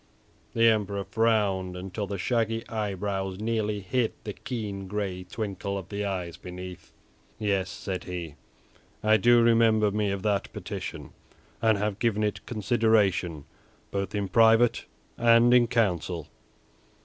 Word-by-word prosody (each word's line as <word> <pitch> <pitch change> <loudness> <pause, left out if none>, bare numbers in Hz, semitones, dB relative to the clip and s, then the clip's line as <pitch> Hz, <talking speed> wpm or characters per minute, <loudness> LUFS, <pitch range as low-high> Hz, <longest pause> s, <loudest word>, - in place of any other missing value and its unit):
The 115 0 +4
Emperor 100 -3 +1
frowned 100 -5 +1
until 95 +3 -5
the 100 0 -4
shaggy 115 +2 -1
eyebrows 100 -3 -3
nearly 105 -2 -1
hid 115 +5 0
the 105 - -5
keen 100 -6 -5
gray 95 -2 -3
twinkle 100 0 -4
of 95 -3 -7
the 105 0 -3
eyes 90 -4 -3
beneath. 90 0 -9 0.5
"Yes," 100 -3 0
said 95 -1 -5
he, 85 -4 -5 0.7
"I 110 0 +5
do 120 +1 +5
remember 115 -2 +4
me 105 0 0
of 100 -1 -3
that 105 -2 0
petition, - - -6 0.5
and 110 -2 +3
have 105 0 -2
given 110 -3 +1
it 105 -1 -2
consideration 105 - +1 0.5
both 100 +1 -3
in 100 -1 -1
private 115 +4 +4 0.3
and 115 +1 +6
in 120 -1 +6
council." 90 - 0
105 Hz, 135 wpm, -27 LUFS, 95-115 Hz, 0.7 s, and